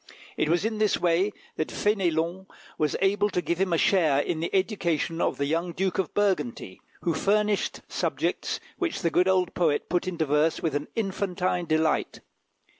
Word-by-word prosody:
It - - 0
was 175 +4 +2
in 220 -1 -1
this 215 -2 +3
way 180 +4 +2 0.3
that 155 - 0
Fénélon 185 -2 0 0.3
was 150 -2 +1
able 205 +2 +2
to 180 - -1
give 175 0 -1
him 190 -2 +1
a 165 - +3
share 160 -6 +3
in 155 +3 0
the 165 - -2
education 170 -5 0
of - - 0
the 140 - 0
young 165 +4 -1
Duke 190 +1 -1
of 190 - -1
Burgundy, 150 - -1 0.2
who 170 - 0
furnished 210 +2 +1
subjects - - -2 0.2
which 345 - -2
the 170 - +2
good 180 +3 +3
old 185 -2 +2
poet 160 -5 +1
put 175 +1 0
into 170 -3 -1
verse 150 +2 +2
with 160 -4 -1
an 145 +1 -2
infantine 185 -4 -1
delight. 155 0 0
175 Hz, 180 wpm, -26 LUFS, 160-195 Hz, 0.3 s, this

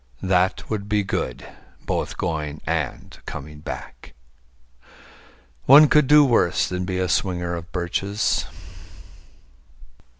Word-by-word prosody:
That 95 0 +1
would 105 -2 -4
be 105 -1 +1
good 65 -9 -4 0.4
both - - -3
going 75 -3 -3
and 80 -4 -3
coming 75 +1 -8
back. 75 - -9 1.5
One 145 +3 +8
could 150 -3 +4
do 150 +1 +7
worse 115 -9 +2
than 90 0 -3
be 90 0 -3
a 95 0 0
swinger 90 -4 -1
of 85 +1 -7
birches. 95 +3 -1
90 Hz, 110 wpm, -22 LUFS, 85-105 Hz, 1.5 s, One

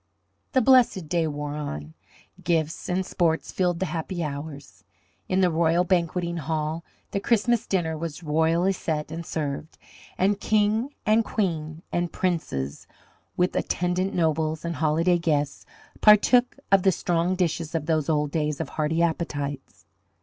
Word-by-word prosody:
The 260 - +4
"blessed 240 -9 +4
day" 165 -1 +1
wore 145 -1 -4
on. 80 - -5 0.5
Gifts 165 -1 -1
and 185 +1 0
sports 165 -3 0
filled 180 -2 0
the 190 - 0
happy 175 0 -3
hours. 145 -6 -7 0.5
In 185 +1 +2
the 180 -2 +3
royal 165 +2 +3
banqueting 170 -1 0
hall 155 +1 -2 0.3
the 200 - -1
Christmas 235 +2 +1
dinner 170 -4 0
was 165 +1 -6
royally 165 +4 +2
set 155 -4 -3
and 165 +1 -5
served, 155 -1 -4 0.4
and 195 +2 +2
King 215 +6 +1
and 220 +1 +4
Queen 160 -7 -2
and 175 -1 -1
Princes, 155 - -2 0.5
with 180 0 +1
attendant 180 +2 -1
nobles 160 -1 0
and 170 -2 -3
holiday 165 +3 +2
guests, 150 -4 -1 0.3
partook 245 +5 +5
of 195 -1 +6
the 190 - +4
strong 175 +1 0
dishes 170 -3 -1
of 155 -2 -1
those 155 -1 0
old 150 -2 +1
days 150 -2 -1
of 160 - -3
hearty 160 +2 0
appetites. 145 -4 -3
165 Hz, 145 wpm, -25 LUFS, 155-185 Hz, 0.5 s, of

